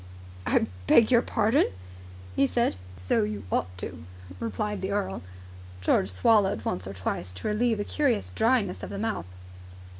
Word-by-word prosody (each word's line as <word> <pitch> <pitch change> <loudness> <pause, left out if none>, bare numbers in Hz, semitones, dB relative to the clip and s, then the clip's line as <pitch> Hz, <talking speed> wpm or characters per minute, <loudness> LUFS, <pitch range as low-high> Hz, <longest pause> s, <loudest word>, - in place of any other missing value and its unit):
"I - - +3 0.2
beg 230 +1 +6
your 235 -2 +6
pardon?" 225 +2 +2 0.7
he 140 - +4
said. 235 - +1 0.2
"So 90 0 +1
you 105 -1 -2
ought 85 - +1
to," 85 -3 -7 0.4
replied 190 - -2
the 190 - -2
earl. 200 - -1 0.6
George 95 +1 +2
swallowed 190 - +3
once 90 0 -2
or 95 - -5
twice 90 -1 -3
to 90 - -5
relieve 220 +1 +1
a - - 0
curious 255 -3 0
dryness 225 -5 +2
of - - -6
the 200 - -5
mouth. 220 - -2
200 Hz, 155 wpm, -27 LUFS, -, 0.7 s, beg